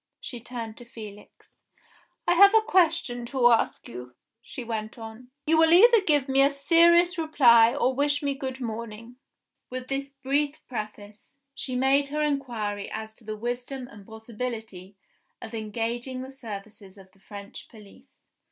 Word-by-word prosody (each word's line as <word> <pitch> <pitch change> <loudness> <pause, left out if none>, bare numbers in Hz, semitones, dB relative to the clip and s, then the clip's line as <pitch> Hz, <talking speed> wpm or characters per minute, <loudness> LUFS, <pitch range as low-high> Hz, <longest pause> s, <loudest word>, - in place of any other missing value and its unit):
She 245 - -8
turned 230 -2 -7
to 240 - -11
Felix. 210 -3 -13 0.7
"I - - +5
have 400 +4 +7
a 445 - +7
question 330 - +1
to 245 -2 +3
ask 230 - +1
you," 125 +1 -10 0.3
she 255 +1 -8
went 220 -1 -5
on. 225 +2 -10 0.2
"You 320 +1 +3
will 325 0 +5
either 455 +6 +7
give 295 -7 +1
me 270 0 +3
a 275 - +5
serious 340 +5 +4
reply, 240 -8 +5
or 260 - +1
wish 290 +2 0
me 280 -1 0
good 265 -1 -6
morning." 230 0 -7 0.5
With 255 0 -6
this 275 0 -4
brief 280 +2 -1
preface, 215 +1 -8 0.2
she 270 -2 -5
made 270 +2 +3
her 300 +2 -2
inquiry 235 -9 -2
as 220 0 -6
to 225 - -18
the 215 0 -6
wisdom 245 +3 -4
and 205 -1 -13
possibility 220 -4 -7 0.4
of 225 - -10
engaging 235 +4 -4
the 265 - -9
services 210 -5 -10
of 190 -1 -16
the 195 - -28
French 200 +1 -11
police. 210 -3 -18
245 Hz, 160 wpm, -26 LUFS, 220-280 Hz, 0.7 s, have